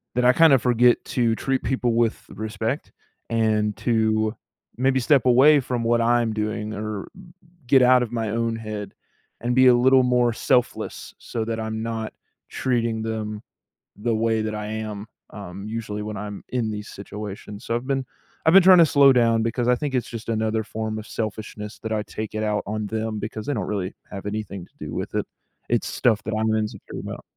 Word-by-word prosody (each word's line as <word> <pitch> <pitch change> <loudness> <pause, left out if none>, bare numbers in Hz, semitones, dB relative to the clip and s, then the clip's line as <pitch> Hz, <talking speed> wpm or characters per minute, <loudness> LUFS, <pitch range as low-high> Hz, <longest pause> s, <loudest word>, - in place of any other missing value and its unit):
that 125 - +2
I 125 - +6
kind 165 +3 +6
of 130 - +5
forget 125 -1 +4
to 115 -3 +1
treat 135 +3 -1
people 125 -3 0
with 115 -1 +2
respect, 110 +5 -4 0.4
and 110 -2 +1
to 110 -1 +1 0.4
maybe 130 +1 +2
step 130 0 +3
away 140 +4 +6
from 125 -2 -2
what 115 0 +2
I'm 120 -1 +2
doing, 110 0 -3
or 105 -1 -5 0.6
get 130 +1 +6
out 125 0 +6
of 120 - -5
my 115 -3 -2
own 115 0 -1
head, 110 -2 -6 0.5
and 120 +1 0
be 130 0 +6
a 125 - +7
little 130 +1 +5
more 125 -1 +2
selfless, 125 +2 -1
so 115 -2 -4
that 115 0 -3
I'm 110 0 -3
not 115 -1 -4 0.4
treating 115 -3 -1
them 110 -1 -4 0.6
the 115 +3 -1
way 110 0 +1
that 110 0 -3
I 105 0 -4
am, 110 -1 -5 0.2
um, 100 -1 -8
usually 110 -2 -4
when 105 0 -5
I'm 105 0 -6
in 120 -3 -1
these 105 0 -6
situations. 105 +2 -8
So, 115 - -2
I've 120 +2 -2
been 135 -2 -1 0.4
I've 160 - +5
been 195 - +9
trying 185 0 +8
to 165 - +7
slow 140 -2 +6
down, 115 -2 +3
because 120 +2 -1
I 125 - +4
think 145 +1 -3
it's 125 - 0
just 115 -1 -8
another 110 -1 0
form 110 0 -4
of 110 - -8
selfishness 110 -1 -5
that 110 - -3
I 105 -1 0
take 110 0 -6
it 110 - -2
out 105 -1 0
on 105 0 -3
them, 110 0 -3
because 110 0 -5
they 145 - -1
don't 105 -6 -2
really 95 -2 -3 0.2
have 100 0 -7
anything 105 -3 -4
to - - -32
do - - -6
with - - -4
it. - - 0 0.4
It's - - +1
stuff 110 -4 +1
that 110 0 -3
I'm 110 0 +1
insecure 105 -1 -4
about. - - -7
110 Hz, 200 wpm, -23 LUFS, 110-120 Hz, 0.6 s, been